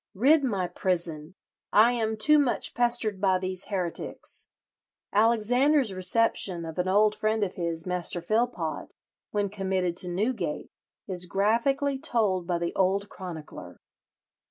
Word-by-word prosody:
rid 280 +9 +4
my 200 -8 0
prison! 170 -3 -3 0.4
I 220 +3 +6
am 220 -2 -1
too 300 +7 +5
much 265 -4 0
pestered 235 -5 +1
by 190 -2 +3
these 185 0 -3
heretics.'" 180 -4 -3 0.7
Alexander's 235 +4 +3
reception 185 -2 0
of 160 +2 -7
an 180 - 0
old 210 +3 +4
friend 215 0 0
of 185 - -2
his, 170 -2 -3
Master 180 -1 -1
Philpot, 215 -3 -2 0.4
when 205 -1 0
committed 190 -3 -2
to 180 - +2
Newgate, 185 -4 -2 0.4
is 180 -2 -2
graphically 235 +9 +1
told 210 - 0
by 175 -2 0
the 170 0 -3
old 195 +2 +1
chronicler. 170 -5 -9
195 Hz, 130 wpm, -27 LUFS, 180-230 Hz, 0.7 s, I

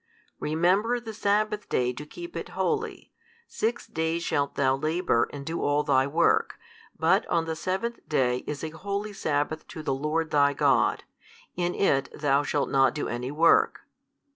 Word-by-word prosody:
Remember 185 +10 +2
the 225 -2 -8
sabbath 210 +1 0
day 125 0 +1
to 150 +4 -8
keep 345 - -9
it - - -5
holy, 450 0 -2 0.4
six 230 +2 -2
days 160 +1 -2
shalt 140 -3 -1
thou 135 -1 +2
labour 155 -3 +1
and 140 -1 -7
do 165 +2 -3
all 145 +1 +2
thy 135 -2 +3
work, 165 +4 +2 0.4
but - - +3
on 165 -1 +1
the 160 0 -3
seventh 190 +8 -2
day 125 -5 +2
is 150 0 -4
a 160 - -3
holy 200 +5 -4
sabbath 155 -3 -2
to 160 -3 -8
the 140 -3 0
Lord 155 +4 -1
thy 145 -1 +4
God: - - +2 0.5
in 175 0 -1
it 135 -9 +2
thou 140 -1 +3
shalt 145 -1 -1
not 135 +1 +3
do 150 - -2
any 120 +2 -3
work. 160 +4 +3
155 Hz, 165 wpm, -27 LUFS, 140-190 Hz, 0.5 s, thy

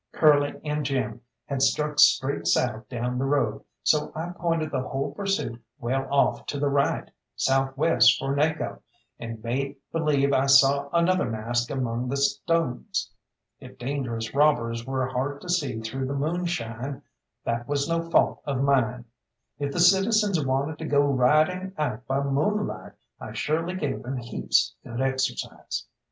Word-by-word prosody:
Curly 145 -2 +3
and 150 0 -2
Jim 130 -5 -2 0.2
had 140 -2 -3
struck 150 +2 +1
straight 140 -1 +4
south 110 -2 +1
down 125 0 -2
the - - 0
road, 135 -6 0 0.2
so 150 -1 +2
I 165 +3 -4
pointed 165 -3 -1
the 130 - -1
whole 135 +2 -3
pursuit 150 - -2
well 135 +1 -2
off 140 - +2
to 145 - -3
the 145 0 +1
right, 140 0 0 0.2
south 135 0 +1
west 125 -6 +5
for 135 +1 -2
Naco, 150 +2 -1 0.4
and 115 -1 -7
made 135 +4 -2 0.2
believe 145 -4 +2
I 135 +1 +3
saw 140 +1 +5
another 170 -4 +2
mask 120 +2 -1
among 125 -2 -2
the 140 - -1
stones. 140 0 0 0.5
If - - -13
dangerous 120 -3 -3
robbers 125 -5 +2
were 130 -1 0
hard 130 +3 -3
to 180 - -10
see 145 -10 0
through 130 +4 -3
the 140 - -3
moonshine, 145 -5 -3 0.4
that 120 +1 -2
was 140 0 0
no 165 0 -1
fault - - +3
of 135 -2 0
mine. 125 -3 +1 0.5
If 140 -1 -2
the 175 - -3
citizens 195 0 +4
wanted 135 +3 -1
to 160 - -5
go 145 -2 +3
riding 155 +8 +2
out 130 -5 -3
by 135 +1 0
moonlight, 155 +10 -1 0.3
I - - -8
surely 165 +4 -1
gave 145 -7 -2
them 130 +1 -4
heaps 120 -1 0
good 120 0 -6
exercise. 135 0 -2
140 Hz, 155 wpm, -26 LUFS, 125-155 Hz, 0.5 s, west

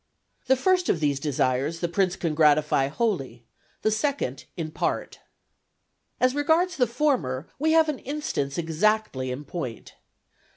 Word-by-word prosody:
The 265 - +5
first 365 +6 +2
of 165 - +2
these 145 -3 +1
desires 140 +2 0
the 175 - 0
prince 185 +1 +1
can 165 -5 -2
gratify 150 -3 +3
wholly, 140 - -2 0.4
the 215 - +3
second 220 - -1
in 160 -2 -4
part. - - -2 1.0
As 255 0 +3
regards 320 +6 +2
the 250 -3 +2
former, 210 - 0
we 315 +2 +2
have 320 -1 +5
an 300 -4 -2
instance 270 - -3
exactly 165 -4 0
in 130 +4 -5
point. 130 - -6
170 Hz, 140 wpm, -25 LUFS, -, 1.0 s, The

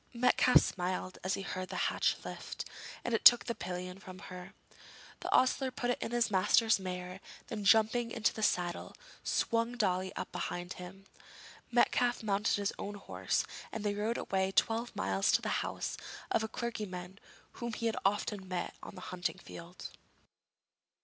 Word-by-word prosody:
Metcalfe 250 +1 +6
smiled 185 0 -2
as 185 +2 +1
he 195 - -5
heard 185 -1 -4
the - - -3
latch - - +2
lifted, - - -6 0.4
and 230 -2 0
took 240 - +9
the 235 - -1
pillion 180 -1 -5
from 185 -1 -10 0.2
her. 180 0 -9 0.6
The - - -4
ostler 260 +1 +4
put 245 -1 -1
it - - -2
on - - -3
his 240 -1 +1
master's 215 +3 +4
mare, 180 0 -5 0.3
then 215 -3 -4
jumping 225 +3 +4
into 225 -2 +1
the 220 - -5
saddle, 175 -4 0 0.3
swung 230 +1 +1
Dolly 185 -4 +1
up - - -4
behind 175 +1 -3
him. 190 +2 -10 0.6
Metcalfe 240 0 +3
mounted 205 0 +2
his 205 -1 -1
own 205 +1 -4
horse, 205 - -1 0.3
and 220 - -4
they 205 -1 +1
rode 215 +3 -1
away 190 0 0
twelve 230 +4 +1
miles 95 +1 +2
to - - +4
the - - -1
house - - -3 0.3
of 225 - +3
a - - -1
clergyman 195 -6 -5 0.4
whom 235 -1 -2
he 230 - -3
had 225 - +1
often 200 -1 0
met 180 -1 -3
on - - -9
the - - -9
hunting 180 +1 -2
field. 175 -1 -9
200 Hz, 165 wpm, -33 LUFS, 185-230 Hz, 0.6 s, took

